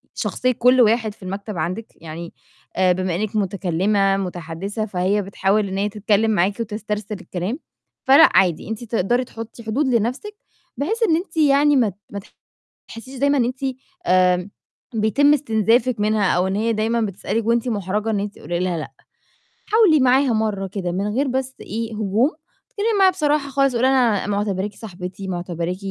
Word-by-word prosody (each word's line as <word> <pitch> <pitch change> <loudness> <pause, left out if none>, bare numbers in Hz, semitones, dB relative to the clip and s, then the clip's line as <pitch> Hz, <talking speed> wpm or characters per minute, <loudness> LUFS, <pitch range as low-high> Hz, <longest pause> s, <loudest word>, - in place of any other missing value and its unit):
شخصية 255 - 0
كل 250 +1 +4
واحد 225 -1 +2
في 200 - -18
المكتب 200 +1 -5
عندِك، 180 +8 -3
يعني، 165 +1 -9 0.4
أ 185 -1 +3
بمِا 185 -1 -2
إنِك 215 +3 -3
مُتكلمة 195 0 +1
متحدثة، 180 +3 -4
فهي 195 +1 0
بتحاول 200 +1 0
إن 190 - -4
هي 205 +1 0
تتكلم 215 +1 +1
معاكِ 200 +2 +1
وتسترسل 210 -1 -4
الكلام. 195 - -4 0.5
فلأ، 280 +5 +8
عادي، 180 -1 +2
أنتِ 225 +1 -5
تقدري 235 +2 0
تحطي 230 0 -9
حدود 255 +6 0
لنفسِك، 250 - -1 0.4
بحيث 440 - -1
إن 325 -7 +3
أنتِ 335 -1 -5
يعني 290 -1 +4
ما 240 -5 +3
ت 185 - -12 0.2
ما 200 - -5 0.7
تحسيش 255 +3 -10
دايمًا 280 +1 +3
أنتِ، 250 +1 0 0.5
آمم، 180 +1 +3 0.4
بيتم 220 +7 +3
استنزافِك 235 -2 +1
منها 210 -2 +2
أو 180 +2 +1
إن 190 - -2
هي 225 +2 +1
دايمًا 225 +2 0
بتسألِك 215 +2 -2
وأنتِ 235 +1 +1
مُحرجة 210 0 -2
إن 210 - 0
أنتِ 205 0 -5
تقولي 170 +3 -4
لها 180 -2 -1
لأ. 155 - -6 0.8
حاولي 420 -8 +5
معاها 260 0 +3
مرة 215 -3 -1
كده 185 -2 -4
من 195 +3 -1
غير 275 +2 +1
بس 260 0 -2
إيه 225 +1 -5
هجوم، 215 - +1 0.4
اتكلمي 435 -2 0
معاها 380 -1 +6
بصراحة 300 -5 0
خالص، 275 -1 +1
قولي 250 +2 +3
لها 245 -6 +2
أنا - - -5
مُعتبراكِ 205 -1 -2
صاحبتي، 190 -1 -8
معتبراكِ، 175 0 -3
215 Hz, 165 wpm, -21 LUFS, 195-255 Hz, 0.8 s, فلأ